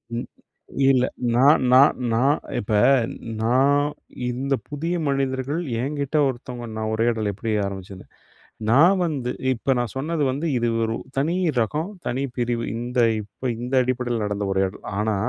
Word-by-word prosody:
ம். 120 - -4 0.6
இல்ல 130 -2 +4 0.3
நான் 140 +4 +5
நான் 135 +3 +6
நான் 135 +6 +3 0.2
இப்ப 105 - -3 0.7
நான் 135 +5 +3 0.5
இந்த 135 +3 -2 0.2
புதிய 165 +4 -2
மனிதர்கள், 135 +2 -1 0.2
என்கிட்டே 145 +2 -1
ஒருத்தவங்க, 125 -1 -5
நான் 110 0 -2
உரையாடல் 110 -1 +1
எப்படி 110 +3 -4
ஆரம்பிச்சது. 95 -1 -7 0.7
நான் 170 +10 +6
வந்து 140 -7 -2 0.2
இப்ப 130 +3 0
நான் 120 -3 -2
சொன்னது 155 +3 -1
வந்து, 145 +6 -3
இது 120 - 0 0.2
ஒரு 115 0 -1 0.2
தனி 160 +6 +1 0.2
ரகம், 150 - -1 0.2
தனி 130 +3 -1
பிரிவு. 120 -1 -1
இந்த 120 +2 -4 0.2
இப்ப, 115 +5 -5
இந்த 125 +2 -3
அடிப்படைல 125 -1 -1
நடந்த 105 -1 -2
உரையாடல். 95 0 -1
ஆனா, 110 0 +1
125 Hz, 135 wpm, -23 LUFS, 115-140 Hz, 0.7 s, நான்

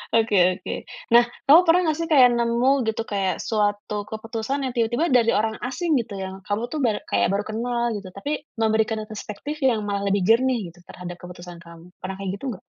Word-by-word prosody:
Oke 225 -2 +2 0.2
oke. - - -6 0.4
Nah, 240 0 +8 0.2
kamu 310 +5 +9
pernah 345 +2 +5
gak 310 - 0
sih 330 - -2
kayak, 255 -4 +7
nemu 235 +2 +2 0.2
gitu, 220 +1 -1
kayak 195 -2 0
suatu 205 -1 -1
keputusan 225 +5 -4
yang 250 - -5
tiba-tiba 240 +7 +1
dari 235 -2 +4
orang 220 0 0
asing 305 +6 -1
gitu, 220 -2 -10
yang 190 0 -7
kamu 205 +2 -1
tuh 310 - -3
bar 220 -3 +2
kayak 100 0 +2
baru 205 +1 0
kenal 235 +2 -2
gitu, 195 -2 -9
tapi 200 +10 -5 0.3
memberikan 220 0 +1
perspektif 215 +8 -6
yang 235 -5 +3
malah 200 0 -2
lebih 200 0 +1
jernih 230 -4 +2
gitu 175 - -22
terhadap 175 -1 -8
keputusan 175 -1 -10
kamu, 170 +1 -14
pernah 190 +1 -5
kayak 195 -1 -3
gitu 275 - -9
ga? - - -29
220 Hz, 200 wpm, -23 LUFS, 200-245 Hz, 0.4 s, kamu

